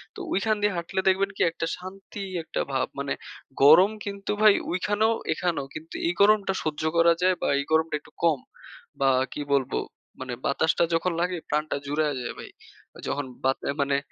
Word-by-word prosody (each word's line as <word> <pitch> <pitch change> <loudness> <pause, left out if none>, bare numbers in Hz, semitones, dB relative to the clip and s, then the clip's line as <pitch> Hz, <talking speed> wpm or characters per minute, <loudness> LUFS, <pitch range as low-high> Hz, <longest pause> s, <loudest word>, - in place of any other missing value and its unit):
তো - - -9
ওইখান 215 +3 +1
দিয়ে 205 -1 +2
হাঁটলে 170 +2 -2
দেখবেন 195 +1 +3
কি - - -3
একটা 165 - -3
শান্তি 195 +3 -9 0.2
একটা - - -3
ভাব। 130 - +1
মানে 140 -1 -1 0.5
গরম 170 +8 +8
কিন্তু 200 0 -4
ভাই 215 -2 +8 0.2
ওইখানেও, 210 +5 +1 0.2
এখানেও; 160 -4 -1
কিন্তু 160 +1 -8
এই 175 - +1
গরমটা 200 -2 +4
সহ্য 155 -1 -3
করা 170 0 +6
যায় 185 0 +4
বা - - 0
এই 140 - -2
গরমটা 160 -1 +2
একটু - - -20
কম। 160 -5 +3 0.6
বা 135 - +5 0.2
কি - - -4
বলবো 135 -1 +1 0.4
মানে 130 -1 -5
বাতাসটা 160 +4 +2
যখন 165 +2 +1
লাগে 180 0 0
প্রাণটা 150 0 0
জুড়াইয়া 150 0 0
যায় 120 - -4
ভাই। - - -8 0.6
যখন 145 0 -2 0.2
বাত 135 0 +2 0.2
মানে 140 0 +2
170 Hz, 175 wpm, -26 LUFS, 145-195 Hz, 0.6 s, গরম